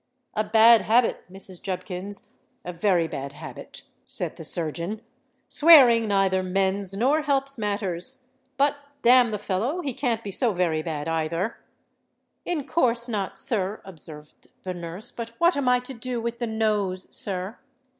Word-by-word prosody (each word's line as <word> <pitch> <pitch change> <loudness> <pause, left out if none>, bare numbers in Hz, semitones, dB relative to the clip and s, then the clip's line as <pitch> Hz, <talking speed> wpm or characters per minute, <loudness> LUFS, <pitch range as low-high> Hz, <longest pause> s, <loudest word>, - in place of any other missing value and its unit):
"A 215 - 0
bad 225 +1 +6
habit, 230 -4 +1
Mrs. 190 -1 -7
Jubkins—a 185 -1 -7
very 175 -1 +1
bad 140 -2 -6
habit," - - -9 0.2
said - - -2
the - - -9
surgeon: 170 +6 -2 0.5
"swearing 255 -8 +7
neither 195 -2 +2
mends 190 +1 -1
nor 275 +8 +2
helps 275 -3 0
matters. 205 +4 -2 0.3
But 285 +1 +2 0.3
damn 245 0 +6
the 210 - -2
fellow—he 245 - -2
can't 230 -3 -1
be 200 - -5
so 230 +2 +1
very 170 -3 0
bad, 155 -2 -4
either." 165 +6 -2 0.9
"In 310 -6 -2
course 240 -6 +1
not, 205 -5 -3
sir," 205 -3 +2
observed 155 -4 -6 0.2
the 185 - -4
nurse. 175 +6 -4
"But 230 -1 -7
what 345 +1 +3
am 280 -3 +1
I 250 0 +4
to 250 +2 -9
do 245 0 -4
with 235 +1 -4
the 240 - -2
Nose, 210 -4 -1
sir?" 190 +2 -2
210 Hz, 145 wpm, -25 LUFS, 185-245 Hz, 0.9 s, swearing